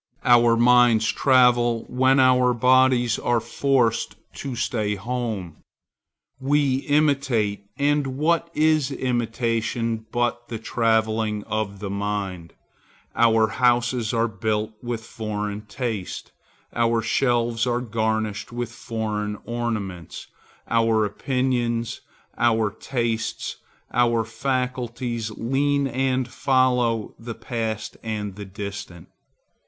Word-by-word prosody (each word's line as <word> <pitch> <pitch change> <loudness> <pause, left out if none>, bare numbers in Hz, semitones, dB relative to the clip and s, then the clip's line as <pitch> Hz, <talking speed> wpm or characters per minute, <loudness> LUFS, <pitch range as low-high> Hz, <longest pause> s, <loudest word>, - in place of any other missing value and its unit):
Our 120 -1 +5
minds 120 -2 +5
travel 120 -3 +3
when 130 +2 +3
our 125 -1 +4
bodies 125 -1 +3
are 120 -1 +1
forced 125 -2 0 0.2
to 135 -3 -5
stay 110 -3 -1
at 100 - -7
home. 110 -10 -3 0.8
We 140 -1 +2
imitate; 135 -9 +1
and 145 -2 +1
what 170 +3 +1
is 155 -3 +3
imitation 115 -2 -1
but 120 0 -1
the 115 - -4
travelling 110 -2 0
of 105 -2 -3
the 100 -2 -4
mind? 100 -4 -3 0.6
Our 115 -1 +4
houses 120 0 +1
are 115 0 +1
built 110 0 -2
with 120 -2 -4
foreign 105 -1 -4
taste; 110 -5 -4 0.4
our 115 -1 +1
shelves 120 0 +1
are 120 0 +1
garnished 110 -3 -2
with 120 -1 -4
foreign 110 -3 -3
ornaments; 110 -8 -4 0.4
our 115 -2 +2
opinions, 120 +1 -1 0.4
our 115 -3 +2
tastes, 115 0 -3 0.4
our 120 -1 +3
faculties, 120 -1 -2
lean, 140 +6 0
and 130 -1 0
follow 125 -4 +1
the 115 0 -7
Past 110 -2 -4
and 105 -3 -4
the 100 0 -7
Distant. 100 -3 -7
115 Hz, 105 wpm, -23 LUFS, 110-125 Hz, 0.8 s, Our